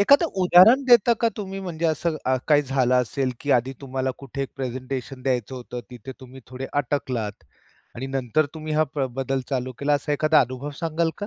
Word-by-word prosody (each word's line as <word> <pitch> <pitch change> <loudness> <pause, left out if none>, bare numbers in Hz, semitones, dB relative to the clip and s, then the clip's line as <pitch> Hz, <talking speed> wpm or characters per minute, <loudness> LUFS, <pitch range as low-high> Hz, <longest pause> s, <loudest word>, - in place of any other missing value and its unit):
एखादं 280 +10 +5 0.2
उदाहरण 185 +9 +7
देता 240 -2 +6
का 230 - +4
तुम्ही? 195 -2 -5
म्हणजे 170 -3 -5
असं 160 +1 0
अ, 130 0 +3
काही 150 -1 +5
झालं 130 -2 +1
असेल 125 +1 0
की 145 - -3
आधी 130 +3 -5
तुम्हाला 130 -1 -2
कुठे 140 0 -5
एक 135 - -4
प्रेझेंटेशन 130 0 -5
द्यायचं 130 -1 -1
होतं 125 -1 -7
तिथे 125 +2 -9
तुम्ही 130 0 -12
थोडे 130 +1 -6 0.2
अटकलात 120 - -3 0.5
आणि 130 +3 -5
नंतर 135 +2 0
तुम्ही 155 -1 -5
हा 155 +1 +3
प्र 140 -2 -2
बदल 135 0 -1
चालू 130 -1 -2
केला, 145 +1 0
असा 145 +1 -1
एखादा 155 +2 +4
अनुभव 130 +3 -3
सांगाल 165 0 0
का? 205 - -4
135 Hz, 190 wpm, -24 LUFS, 130-155 Hz, 0.5 s, उदाहरण